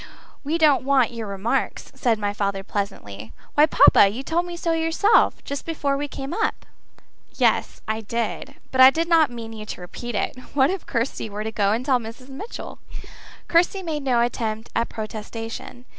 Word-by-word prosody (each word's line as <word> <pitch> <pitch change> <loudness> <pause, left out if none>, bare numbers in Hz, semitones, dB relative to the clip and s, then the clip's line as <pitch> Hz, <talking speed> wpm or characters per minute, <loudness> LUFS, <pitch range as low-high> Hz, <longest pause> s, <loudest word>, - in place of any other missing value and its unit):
We 305 +4 0
don't 300 -5 +4
want 270 -3 +3
your 230 -2 -6
remarks," 200 +3 -2
said 235 -4 +1
my 205 -1 -2
father 200 -1 -2
pleasantly. 110 - -5 0.2
"Why, 300 +1 +5
papa, 200 - +6
you 235 +7 -5
told 340 +4 0
me 345 -1 -6
so 335 -1 -1
yourself, 325 +6 +3
just 280 0 -5
before 290 -4 -1
we 290 +1 -2
came 270 0 -6
up." 440 - -1 0.7
"Yes, - - +1
I 220 +1 -1
did; 230 +1 -3 0.2
but 260 - +3
I 260 - +11
did 330 +4 -1
not 330 -3 +5
mean 230 -2 -8
you 215 -1 -7
to 185 - -6
repeat 235 +6 -7
it. 230 +5 -2 0.2
What 275 +3 +4
if 380 -2 -5
Kirsty 230 -2 -2
were 210 +1 -5
to 220 - -3
go 205 -2 +1
and 235 +4 -1
tell 260 -3 +3
Mrs. 235 +3 -10
Mitchell?" 345 - -8 0.7
Kirsty 355 +3 +2
made 310 -4 -3
no 250 -4 +2
attempt 225 -2 -2
at 230 - 0
protestation. 225 +2 -7
245 Hz, 185 wpm, -23 LUFS, 220-295 Hz, 0.7 s, I